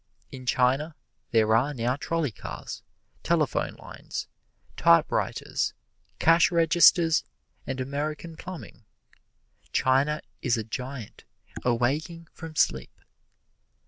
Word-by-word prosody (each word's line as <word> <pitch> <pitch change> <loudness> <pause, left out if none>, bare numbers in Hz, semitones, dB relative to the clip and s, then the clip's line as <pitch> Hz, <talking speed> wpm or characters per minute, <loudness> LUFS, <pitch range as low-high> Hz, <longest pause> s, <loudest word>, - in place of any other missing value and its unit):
In 130 -1 -9
China 135 +6 +2 0.3
there 110 -1 +3
are 140 +6 +1
now 120 +1 0
trolley 165 -1 -1
cars, 100 - -8 0.4
telephone - - 0
lines, - - -7 0.5
typewriters, 85 - +2 0.4
cash 165 +1 +5
registers 165 -1 +5 0.4
and 130 -1 -3
American 150 +5 -4
plumbing. 175 -8 -9 0.9
China 140 +4 +2 0.2
is 120 -2 +1
a 110 - -2
giant 125 +1 -7 0.4
awaking 145 +8 -1
from 160 -2 -9
sleep. 65 - 0
140 Hz, 95 wpm, -27 LUFS, 125-160 Hz, 0.9 s, cash